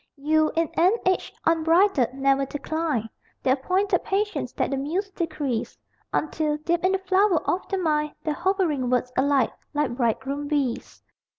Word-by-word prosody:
You, 310 +2 +2
in 330 0 +2
an 360 +4 +5
age 370 0 +1
unbridled, 330 - +3
ne'er 275 0 +2
declined 290 -5 -2 0.4
The 260 - +3
appointed 365 +8 +1
patience 415 +2 -1
that - - -1
the - - +1
Muse 350 +9 -2
decrees, 310 -10 -3 0.3
Until, 305 -1 0
deep 340 +3 -1
in 370 +1 +3
the - - +3
flower 380 -2 +2
of 365 - -1
the 390 - 0
mind 300 -4 0
The 305 - 0
hovering 345 -7 0
words 250 0 0
alight, 270 -2 +2 0.2
like 295 -5 0
bridegroom 270 +4 -1
bees. 280 -5 -2
310 Hz, 155 wpm, -25 LUFS, 275-365 Hz, 0.4 s, an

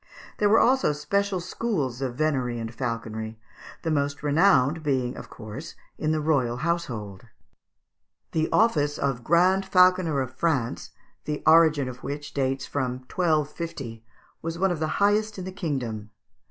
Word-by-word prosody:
There 205 - +3
were 220 - +6
also 255 - +3
special 190 +6 0
schools 170 - -2
of 130 -3 -2
venery 130 -5 0
and 115 0 -5
falconry, 115 -3 -4 0.5
the 165 - -1
most 140 -1 -1
renowned 150 -1 +4
being 130 -4 0
of - - -9
course 115 +8 -9 0.2
in 155 -1 0
the 155 - +1
royal 140 -6 +1
household. 125 - -3 1.0
The 160 0 0
office 150 -10 +2
of 135 -3 -1
Grand 180 +6 +4
Falconer 180 -5 +4
of 130 -1 -3
France, 130 - -1 0.4
the 150 0 -3
origin 155 -4 +5
of 125 0 -8
which 145 +2 -6
dates 135 -1 -1
from 130 -3 -2 0.2
1250, 150 -8 -1 0.4
was 165 +1 -4
one 190 +1 +2
of 175 - -2
the 155 - 0
highest 210 +1 +2
in 185 - -5
the 190 - -5
kingdom. 125 - -4
150 Hz, 150 wpm, -26 LUFS, 125-170 Hz, 1.0 s, were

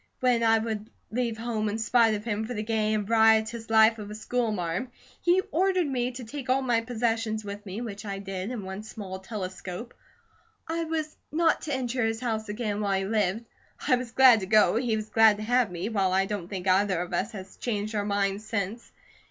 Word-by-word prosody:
When 250 -2 +3
I 225 -1 +5
would 220 -1 -3 0.2
leave 235 -1 -1
home 220 -2 -2
in 210 - -2
spite 225 0 +3
of 210 - -5
him 220 -1 -2
for 245 - -5
the 210 - -2
gay 215 -1 +1
and 210 -2 -2
riotous 225 0 +3
life 220 0 +5
of 205 -1 -7
a 210 - -7
school 230 +1 -1
marm, 180 +4 -2 0.3
he 355 +2 +4
ordered 370 +1 +2
me 250 -3 -1
to 250 +1 -7
take 260 +3 -7
all 265 +1 +3
my 240 -3 +2
possessions 225 -2 -1
with 205 0 -6
me, 195 +5 -5
which 205 -4 -6
I 200 -2 -4
did 195 0 -5
in 240 -5 -5
one 190 +2 -5
small 200 -3 -7
telescope. 190 +2 -6 0.7
I 330 +1 -2
was 315 -1 -3 0.2
not 330 +2 +2
to 295 - -3
enter 250 -1 -1
his 225 0 0
house 220 -3 -2
again 210 -1 -2
while 200 -2 +1
he 190 - -1
lived. 210 +1 0 0.4
I 255 - +5
was 250 -1 -4
glad 255 -1 +7
to 190 - -5
go, 210 -3 +5
he 230 -1 +1
was 215 0 -4
glad 220 -2 +5
to 215 - -5
have 245 0 +2
me, 175 +3 -3
while 195 -4 +1
I 190 +1 +3
don't 195 -4 -4
think 190 -1 -5
either 190 -1 +3
of 175 0 -4
us 200 +6 -1
has 190 -2 -9
changed 215 -2 -2
our 205 -1 0
mind 200 0 0
since. 215 +1 -4
220 Hz, 220 wpm, -27 LUFS, 205-240 Hz, 0.7 s, glad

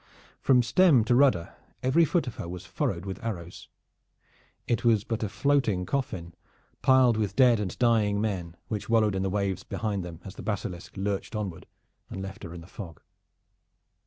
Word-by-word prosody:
From 125 -2 +4
stem 130 +1 +5
to 115 - +2
rudder 125 -10 +3 0.3
every 140 +6 +4
foot 165 0 +1
of 125 - -7
her 85 - -5
was 90 0 -7
furred 85 +2 -2
with 95 +2 -6
arrows. 90 -7 -6 1.0
It 120 - 0
was 115 -4 +4
but 115 -1 -3
a 105 - -1
floating 105 -3 +1
coffin 95 -10 -3 0.5
piled 130 -3 +5
with 105 -3 -1
dead 125 -4 +5
and 100 -4 -3
dying 110 -4 +3
men, 90 -6 -3
which 105 0 -4
wallowed 110 -3 +3
in 95 - -1
the 95 - 0
waves 100 -1 -1
behind 100 -2 -3
them 85 -2 -8
as 95 - -7
the - - -9
Basilisk 95 -4 -4
lurched 100 +2 -2
onward 100 -6 -4 0.4
and - - -6
left 95 0 -7
her 85 - -7
in 85 0 -8
the - - -12
fog. 85 -3 -9
105 Hz, 180 wpm, -27 LUFS, 95-120 Hz, 1.0 s, stem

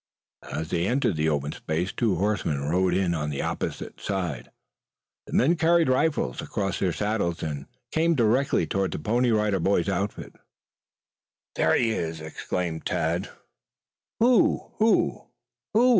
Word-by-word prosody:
As 80 0 -3
they 85 +1 0
entered 125 -5 +1
the 80 +1 +1
open 75 -1 -1
space 80 +5 -2
two 110 -6 +1
horsemen 95 -6 0
rode 90 +6 +1
in 95 -2 +1
on 75 -2 -2
the 70 - -3
opposite - - -4
side. 90 -11 -3 0.8
The - - -9
men 155 +8 +4
carried 170 -2 +3
rifles 130 - +1
across 95 -3 -2
their 95 - +1
saddles, 105 -4 -1
and 75 -3 -4 0.2
came 165 +1 +2
directly 120 - +2
toward 95 +1 -1
the - - -3
Pony 120 +9 +1
Rider 105 -3 +2
Boys' 90 0 +1
outfit. 100 +2 -3 1.2
"There 80 - +3
he 115 -2 +2
is!" 80 -6 -3
exclaimed 80 +1 -4
Tad. 80 +2 -1 0.9
"Who 240 0 +3
who 220 +1 +2 0.5
who?" 245 +3 +6
95 Hz, 145 wpm, -26 LUFS, 80-120 Hz, 1.2 s, who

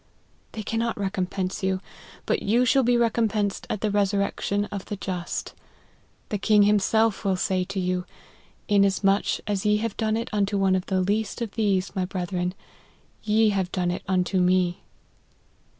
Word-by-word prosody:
They 215 - -5
cannot 230 +2 -1
recompense 190 -1 -2
you, 190 -1 0 0.5
but - - 0
you 235 +5 +2
shall 270 +3 +4
be 245 -1 +3
recompensed 220 -3 0
at 210 - -3
the 215 - 0
resurrection 200 0 0
of 200 -2 -5
the 205 - -4
just. 185 -3 -4 0.8
The 210 - -2
King 210 +1 +4
himself 210 +2 +2
will 195 -2 +1
say 185 0 0
to 200 +1 -4
you, 180 0 -1 0.3
' - - -32
inas 200 -1 +3
much 195 +1 +2
as 205 -2 -1
ye 210 0 +3
have 220 -1 -3
done 220 -1 0
it 230 +1 -4
unto 200 -1 +1
one 190 -1 +3
of 185 0 -2
the 190 -1 +1
least 205 +4 -1
oi - - -2
% - - -23
these, 200 -3 0
my 185 -1 0
brethren, 180 -1 -3 0.7
ye 215 +1 +3
have 190 -3 -1
done 180 -2 0
it 180 - -4
unto 185 0 +1
me." 180 -1 +2
200 Hz, 175 wpm, -25 LUFS, 185-215 Hz, 0.8 s, shall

